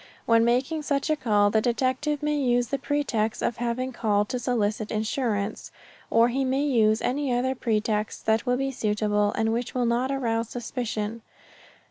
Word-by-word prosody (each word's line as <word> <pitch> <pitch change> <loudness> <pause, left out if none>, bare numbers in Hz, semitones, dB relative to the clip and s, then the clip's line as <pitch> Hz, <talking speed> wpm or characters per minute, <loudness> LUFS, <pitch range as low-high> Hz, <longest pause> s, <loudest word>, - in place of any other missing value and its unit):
When 230 0 +4
making 260 +7 +1
such 285 0 -1
a - - +3
call 205 -7 +2
the 220 - +3
detective 260 +5 0
may 300 0 +1
use 245 -4 +1
the 275 - -1
pretext 230 -7 -1
of 235 - -1
having 245 +2 -2
called 210 -3 +1
to 250 - -2
solicit 220 -3 -1
insurance, 215 -1 -2 0.4
or 230 +1 +4
he 270 +3 0
may 265 +2 0
use 220 -6 +2
any 275 +1 0
other 250 +2 +1
pretext 215 -3 -1
that 220 +3 +1
will 250 0 +2
be 270 +1 -1
suitable 210 -3 0
and 225 0 0
which 240 +2 -3
will 250 -1 +1
not 240 +3 +1
arouse 230 -4 -1
suspicion. 230 -2 -4
240 Hz, 170 wpm, -26 LUFS, 220-260 Hz, 0.4 s, When